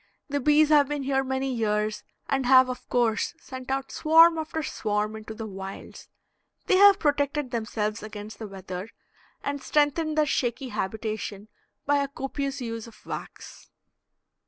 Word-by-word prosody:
The 285 0 0
bees 300 +2 +4
have 295 -2 +5
been 295 -2 -2
here 270 0 +1
many 265 0 -2
years, 215 -2 -1 0.2
and 270 -2 0
have 260 0 +7
of 250 - -7
course 230 -3 +1
sent 260 -1 -9
out 270 0 -2
swarm 325 +1 +6
after 315 0 -3
swarm 210 -4 -2
into 220 0 -8
the 225 - -6
wilds. 195 -1 -9 0.6
They 375 - +4
have 400 0 +8
protected 290 -2 0
themselves 220 -2 -2
against 210 0 -8
the 220 - -5
weather 190 0 -7 0.5
and 285 -1 -3
strengthened 305 +2 +1
their 305 - +4
shaky 255 -1 -1
habitation 215 0 -4 0.4
by 290 0 +3
a 280 0 0
copious 275 0 -4
use 230 -1 -5
of 230 - -17
wax. - - -8
260 Hz, 155 wpm, -26 LUFS, 215-285 Hz, 0.6 s, have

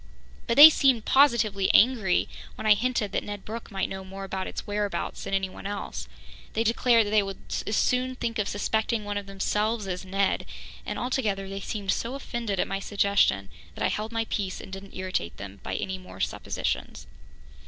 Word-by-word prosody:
But 235 - 0
they 305 +2 +13
seemed 260 -7 +3
positively 225 -8 +4
angry 220 -6 +4 0.3
when - - -7
I 215 - +8
hinted 220 -1 -1
that - - -1
Ned 205 -1 -7
Brooke 225 +2 -6
might 195 -3 -1
know 190 0 -6
more 195 +1 -8
about 190 -1 -4
its - - -6
whereabouts 205 -1 -3
than 195 - -1
anyone 195 0 -3
else. 205 0 -5 0.5
They 225 - +1
declared 230 0 +4
that 205 - -4
they 215 -1 +5
would 195 -1 -5 0.3
as 210 - 0
soon 255 +3 +1
think 230 -2 -3
of 205 - 0
suspecting 220 +1 -1
one 205 0 -2
of 200 - -11
themselves 210 +3 -1
as 180 -1 -3
Ned, 195 +1 0 0.4
and - - -3
altogether 215 -6 -1
they 195 0 -5
seemed 200 -1 -2
so 240 +3 -2
offended 235 -7 -3
at - - +1
my 195 - -2
suggestion 200 - +2 0.3
that - - -1
I - - +3
held 215 +2 -3
my 225 -1 -1
peace 195 -4 -3
and 190 - -10
didn't 195 0 -9
irritate 185 - -3
them 100 0 -9
by - - -4
any 190 0 -3
more 185 - -12
suppositions. - - -3
205 Hz, 195 wpm, -27 LUFS, 195-230 Hz, 0.5 s, they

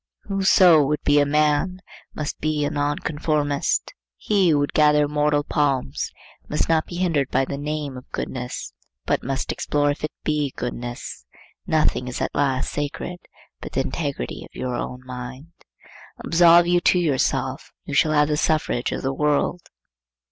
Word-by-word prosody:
Whoso 190 -5 +5
would 150 +2 -1
be 145 0 +4
a 145 - +3
man, 150 +5 +1 0.4
must 150 -1 -4
be 155 -1 0
a - - -1
nonconformist. 145 0 -1 0.2
He 195 -4 +2
who 150 - +4
would 145 0 -1
gather 150 -1 +5
immortal 150 0 +1
palms 140 - -1 0.4
must 150 - 0
not 160 -1 +2
be 175 - -8
hindered 165 -7 0
by 135 - +1
the 140 - -4
name 150 -2 -3
of 125 - -11
goodness, 125 -1 -5 0.3
but - - +1
must 135 0 -2
explore 145 0 0
if 145 - -6
it 155 - -1
be 150 -3 0
goodness. 120 - -6 0.4
Nothing 155 -5 +1
is 125 - -4
at - - -2
last 135 -2 0
sacred 145 +4 -4 0.4
but - - -9
the - - +1
integrity - - -4
of - - -16
your 125 -1 -2
own 125 +1 -5
mind. 130 +4 -8 0.8
Absolve 170 0 +6
you 175 0 +2
to 180 - +4
yourself, 135 -5 0
and - - -13
you - - -4
shall 155 +1 +3
have 150 0 +3
the 150 - +1
suffrage 155 -6 0
of - - -4
the 135 0 0
world. 150 +4 +1
145 Hz, 165 wpm, -23 LUFS, 135-155 Hz, 0.8 s, Absolve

